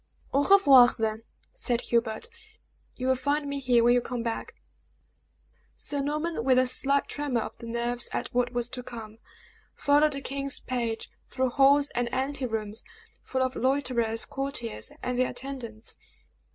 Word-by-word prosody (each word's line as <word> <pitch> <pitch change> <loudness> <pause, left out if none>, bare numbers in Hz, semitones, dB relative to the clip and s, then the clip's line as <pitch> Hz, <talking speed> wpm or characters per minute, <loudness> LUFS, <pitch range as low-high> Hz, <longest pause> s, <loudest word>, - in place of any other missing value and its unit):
"Au 280 - +3
revoir, 280 -11 +8
then," 220 -1 -1 0.3
said 245 - -1
Hubert. 235 - -1 0.7
"You 255 - -5
will 260 0 +3
find 285 +3 0
me 280 0 -2
here 245 -3 +3
when 240 +1 +5
you 245 - +3
come 240 -1 -4
back." 230 -1 -4 1.2
Sir 285 -1 -2
Norman, 300 0 -2
with 255 0 +4
a 255 - +5
slight 275 +2 +2
tremor 285 -5 -2
of - - -6
the 230 - -8
nerves 235 +1 -2
at - - -4
what 245 0 +1
was 240 -1 -1
to 255 0 -5
come, 225 -3 -9 0.6
followed 290 +1 +3
the 275 - -4
king's 275 +1 -2
page 235 -3 -3 0.2
through 260 -1 -1
halls 280 +2 +4
and 245 -1 -1
anterooms, 250 -6 -2 0.4
full 260 0 -1
of 260 0 -2
loiterers, 250 -4 +1
courtiers, 270 -5 -3
and 250 0 -1
their 255 - +2
attendants. 235 -5 -6
255 Hz, 155 wpm, -27 LUFS, 235-275 Hz, 1.2 s, revoir